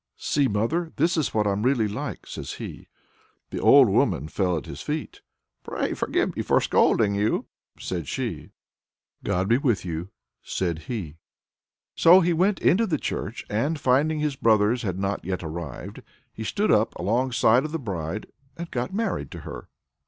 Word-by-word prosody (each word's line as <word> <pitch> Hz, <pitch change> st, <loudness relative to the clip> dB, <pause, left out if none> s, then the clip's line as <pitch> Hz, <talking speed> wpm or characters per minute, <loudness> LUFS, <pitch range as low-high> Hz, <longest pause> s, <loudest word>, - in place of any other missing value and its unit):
"See, 145 Hz, -2 st, +1 dB
mother, 150 Hz, +11 st, -1 dB
this 165 Hz, +4 st, +2 dB
is 155 Hz, -4 st, 0 dB
what 105 Hz, -1 st, +1 dB
I'm 100 Hz, 0 st, 0 dB
really 120 Hz, -2 st, +2 dB
like!" 105 Hz, -, -5 dB
says -, -, -6 dB
he. -, -, -8 dB, 0.6 s
The -, -, -3 dB
old -, -, +7 dB
woman 75 Hz, -, +1 dB
fell 90 Hz, -2 st, 0 dB
at 75 Hz, -, -5 dB
his -, -, -8 dB
feet. -, -, -4 dB, 0.4 s
"Pray -, -, -2 dB
forgive -, -, -1 dB
me -, -, -1 dB
for -, -, +3 dB
scolding 105 Hz, -3 st, +3 dB
you," 105 Hz, +2 st, 0 dB, 0.3 s
said 85 Hz, -6 st, -4 dB
she. -, -, -4 dB, 0.7 s
"God 90 Hz, +2 st, 0 dB
be 115 Hz, +4 st, +3 dB
with 120 Hz, -10 st, 0 dB
you," 85 Hz, +1 st, -4 dB, 0.3 s
said 85 Hz, -4 st, -2 dB
he. 90 Hz, -11 st, -4 dB, 0.8 s
So 175 Hz, +3 st, +7 dB
he 175 Hz, -1 st, +2 dB
went 190 Hz, +4 st, +2 dB
into 225 Hz, +5 st, +3 dB
the 155 Hz, -, 0 dB
church -, -, -4 dB
and, 145 Hz, +9 st, -1 dB
finding 145 Hz, +5 st, +2 dB
his 150 Hz, -2 st, -1 dB
brothers 110 Hz, 0 st, +3 dB
had 95 Hz, -5 st, -3 dB
not 100 Hz, +1 st, -2 dB
yet 90 Hz, 0 st, -3 dB
arrived, 80 Hz, -1 st, -6 dB, 0.3 s
he 110 Hz, -, -6 dB
stood 205 Hz, -, 0 dB
up 110 Hz, +2 st, +2 dB
alongside 120 Hz, +4 st, +2 dB
of 155 Hz, -, -4 dB
the 165 Hz, -, -1 dB
bride 95 Hz, -, -4 dB, 0.3 s
and 170 Hz, 0 st, -6 dB
got 125 Hz, +3 st, -2 dB
married 200 Hz, -, -2 dB
to -, -, -9 dB
her. -, -, -9 dB
110 Hz, 170 wpm, -25 LUFS, 95-150 Hz, 0.8 s, old